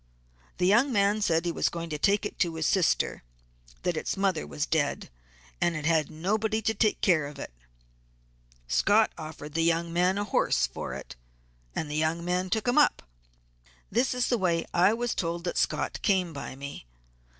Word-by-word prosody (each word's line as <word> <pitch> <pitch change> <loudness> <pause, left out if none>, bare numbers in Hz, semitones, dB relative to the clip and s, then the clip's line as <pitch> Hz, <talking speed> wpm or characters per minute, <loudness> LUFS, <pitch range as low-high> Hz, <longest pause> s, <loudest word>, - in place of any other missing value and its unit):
The - - +1
young 235 +9 +4
man 205 -1 +2
said 165 -5 +2
that 175 - -1
he - - 0
was - - 0
going 170 -1 -6
to 150 - -3
take 200 +6 +2
it - - -6
to 170 -3 +1
his 160 -1 -2
sister; 185 -1 +1 0.6
that 175 - 0
its 155 - -3
mother 190 -5 0
was 150 - -2
dead, 150 -4 -1 0.5
and 170 - +2
it 155 -1 -4
had 160 -2 +2
nobody 215 +7 -1
to 220 0 0
take 215 0 +1
care 160 -6 +3
of 145 - -10
it. - - -7 1.1
Scott 210 - +3
offered 155 -2 -8
the 165 - +1
young 165 0 +1
man 180 +2 +2
a 205 - 0
horse - - +2
for - - -6
it, - - -9 0.6
and 160 - -2
the 150 - -5
young 160 +2 0
man 180 +1 0
took 220 +4 -1
him 245 +5 +4
up. 295 - +3 0.9
This 240 +4 +1
is 250 -1 +1
the 240 - +1
way 170 -3 +1
I 180 +3 +5
was 240 +1 -1
told 170 0 -2
that 175 - -3
Scott - - -1
came 185 -4 +1
by 140 -2 -6
me. 140 - -8
175 Hz, 195 wpm, -28 LUFS, 160-205 Hz, 1.1 s, I